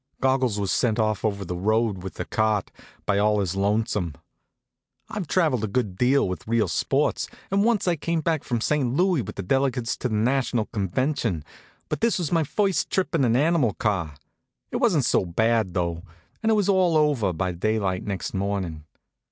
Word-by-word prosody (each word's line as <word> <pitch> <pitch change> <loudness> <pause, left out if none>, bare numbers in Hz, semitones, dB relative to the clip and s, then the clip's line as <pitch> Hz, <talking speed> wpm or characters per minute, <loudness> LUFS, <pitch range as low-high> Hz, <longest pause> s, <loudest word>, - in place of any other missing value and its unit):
Goggles 130 -5 +1
was 100 -2 -1
sent 115 -3 +1
off 110 -3 0
over 100 -3 -1
the 90 - -4
road 105 +1 +1
with 95 +1 -7
the - - -4
cart, 110 -3 0 0.4
all 105 +1 +3
by - - +1
his 95 -1 -2
lonesome. 100 -4 0 0.9
I've 205 -6 -4
traveled 150 - +1
a - - 0
good 105 -3 -1
deal 125 +5 +3
with 90 0 -5
real 115 -1 +2
sports, - - 0 0.2
and 200 +1 +3
once 225 -4 +2
I 175 -2 +2
came 165 +2 -1
back 160 -2 0
from 120 -3 -2
St. 135 -2 0
Louis 180 -3 +2
with 105 -1 -7
the 100 - -4
delegates 130 +2 0
to - - -2
a - - -6
national 120 +1 +1
convention, 110 - -1 0.4
but - - -3
this 230 -1 +2
was 170 -5 -2
my 165 -2 +3
first 195 +5 0
trip 190 -1 -1
in 160 -5 +2
an 120 -2 +3
animal 145 - +2
car. 95 -10 -1 0.6
It - - -1
wasn't - - +2
so - - +3
bad, 110 +2 +1
though, 85 -2 -1 0.4
and 225 - +1
it - - +4
was 205 -2 +1
all 185 -5 +3
over 145 -11 +2
by 90 +2 -2
daylight 95 0 -1
next 95 -4 -4
morning. 95 -6 -3
115 Hz, 190 wpm, -25 LUFS, 100-145 Hz, 0.9 s, it